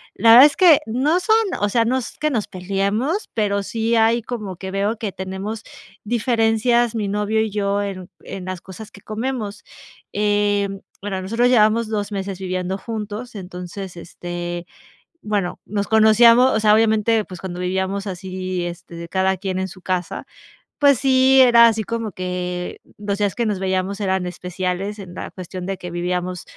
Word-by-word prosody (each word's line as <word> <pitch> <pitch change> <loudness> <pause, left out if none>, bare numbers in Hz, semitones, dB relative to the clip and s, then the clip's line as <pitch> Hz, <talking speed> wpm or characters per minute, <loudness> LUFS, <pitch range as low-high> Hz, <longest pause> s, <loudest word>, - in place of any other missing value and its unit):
la 230 - +3
verdad 245 +4 +11
es 290 - +3
que 345 -5 +7
no 270 +10 +1
son 440 +4 +3 0.2
o 205 - +2
sea, 230 +3 +2
no 245 +3 +1
es 255 - -6
que 305 - 0
nos 230 -8 -1
peleemos, 200 - -1
pero 205 -3 0
sí 225 +3 -2
hay 225 +1 +3
como 215 -5 -5
que 190 +2 -7
veo 200 +3 -1
que 210 -2 -4
tenemos 190 +4 -5 0.4
diferencias 235 +1 +2
mi 210 -3 -1
novio 210 +2 0
y 220 -1 -1
yo 200 0 0
en 185 -2 -6
en 185 -2 -7
las 185 -2 -5
cosas 205 +3 -10
que 200 - -15
comemos, 215 -1 -4 0.5
em, 205 -1 +1 0.2
bueno, 195 -1 -3
nosotros 230 +6 +1
llevamos 225 -1 +3
2 205 -1 -2
meses 195 -1 -4
viviendo 185 0 -3
juntos, 220 +2 -6
entonces, 180 0 -7
este, 175 0 -6 0.6
bueno, 205 -4 -2
nos 200 0 -2
conocíamos, 230 +3 +6
o - - +2
sea, 210 -1 +4
obviamente, 220 0 +2
pues, 180 -2 -10
cuando 180 -2 -6
vivíamos 190 +2 -2
así, 185 -1 -4
este, 175 0 -9
de 170 0 -7
cada 190 +1 +1
quien 190 0 -3
en 190 - -2
su 185 0 -13
casa, 180 -2 -3 0.5
pues 280 -4 +5
sí, 265 0 +4
era 235 -2 +7
así 220 -1 0
como 230 0 -3
que 180 -1 -4 0.2
los 205 -1 -3
días 205 -1 0
que 235 - 0
nos 210 -3 -1
veíamos 190 +1 -1
eran 190 -2 0
especiales 180 +3 -4
en 185 -3 -9
la - - -7
cuestión 185 0 -7
de 195 0 -3
que 180 -1 -8
vivíamos 180 +1 -3
200 Hz, 175 wpm, -21 LUFS, 185-225 Hz, 0.6 s, verdad